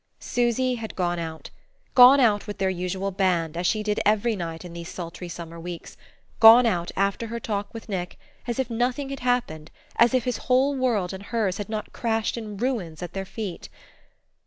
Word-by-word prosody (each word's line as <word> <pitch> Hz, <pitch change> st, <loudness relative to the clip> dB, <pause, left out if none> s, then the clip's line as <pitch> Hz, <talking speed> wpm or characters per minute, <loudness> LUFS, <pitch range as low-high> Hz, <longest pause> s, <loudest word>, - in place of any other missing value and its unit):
Susy 245 Hz, +1 st, 0 dB
had 220 Hz, -, -6 dB
gone 175 Hz, -2 st, -1 dB
out 160 Hz, -1 st, -6 dB, 0.4 s
gone 255 Hz, +2 st, +9 dB
out 215 Hz, -5 st, +3 dB
with 205 Hz, -, -5 dB
their 190 Hz, -1 st, +1 dB
usual 185 Hz, +2 st, -3 dB
band, 180 Hz, -4 st, 0 dB
as 175 Hz, +1 st, 0 dB
she 215 Hz, -1 st, 0 dB
did 210 Hz, -1 st, 0 dB
every 215 Hz, +2 st, +2 dB
night 165 Hz, -2 st, -5 dB
in 175 Hz, -, -9 dB
these 170 Hz, 0 st, -7 dB
sultry 175 Hz, 0 st, -7 dB
summer 170 Hz, 0 st, -8 dB
weeks, 170 Hz, 0 st, -8 dB, 0.4 s
gone 230 Hz, +2 st, +9 dB
out 175 Hz, -6 st, 0 dB
after 200 Hz, +4 st, 0 dB
her 235 Hz, +1 st, -4 dB
talk 205 Hz, -3 st, -3 dB
with 225 Hz, -, -9 dB
Nick, 180 Hz, -4 st, -4 dB, 0.3 s
as 240 Hz, -, -2 dB
if 265 Hz, -2 st, 0 dB
nothing 250 Hz, +4 st, -1 dB
had 275 Hz, -, -5 dB
happened, 240 Hz, -12 st, -1 dB, 0.3 s
as 235 Hz, +2 st, +5 dB
if 255 Hz, -, +2 dB
his 250 Hz, -2 st, -1 dB
whole 265 Hz, +3 st, +3 dB
world 225 Hz, -9 st, 0 dB
and 190 Hz, +1 st, -8 dB
hers 210 Hz, -5 st, -1 dB
had 205 Hz, -, -5 dB
not 215 Hz, -1 st, -5 dB
crashed 225 Hz, -2 st, -1 dB
in 215 Hz, -3 st, -6 dB
ruins 195 Hz, -9 st, -2 dB
at 175 Hz, -, -7 dB
their 195 Hz, 0 st, -4 dB
feet. 200 Hz, -3 st, -6 dB
205 Hz, 195 wpm, -25 LUFS, 180-235 Hz, 0.4 s, gone